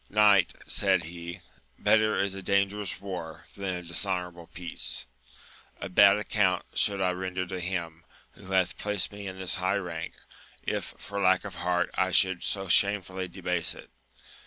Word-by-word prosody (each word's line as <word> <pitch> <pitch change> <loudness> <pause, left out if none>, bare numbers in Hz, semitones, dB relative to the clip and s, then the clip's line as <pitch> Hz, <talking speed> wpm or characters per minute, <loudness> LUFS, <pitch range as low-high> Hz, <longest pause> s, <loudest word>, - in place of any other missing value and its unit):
Knight, 105 -3 +5
said 95 -3 +2
he, 85 +1 -7 0.4
better 110 0 +3
is 100 0 +1
a 95 - -6
dangerous 100 +1 0
war, 90 -5 -6
than 95 -2 -3
a 90 - -6
dishonourable 90 -1 -3
peace: 85 -1 -3 0.7
a 100 - -5
bad 100 +2 +7
account 100 -3 +1
should 100 -1 +2
I 95 -1 +2
render 90 0 -3
to 95 0 -5
Him, 85 -2 -3 0.3
who 95 - -13
hath 95 -2 +1
placed 105 -3 -1
me 100 -1 -7
in 95 0 -6
this 95 -1 -1
high 95 +2 +2
rank, 85 -4 -5 0.5
if - - -3
for 100 0 -5
lack 95 0 +4
of 100 - -6
heart 90 0 0
I 95 - +1
should 95 -1 +3
so 95 -1 -2
shamefully 95 0 +2
debase 90 -2 -1
it - - -13
95 Hz, 160 wpm, -28 LUFS, 90-100 Hz, 0.7 s, bad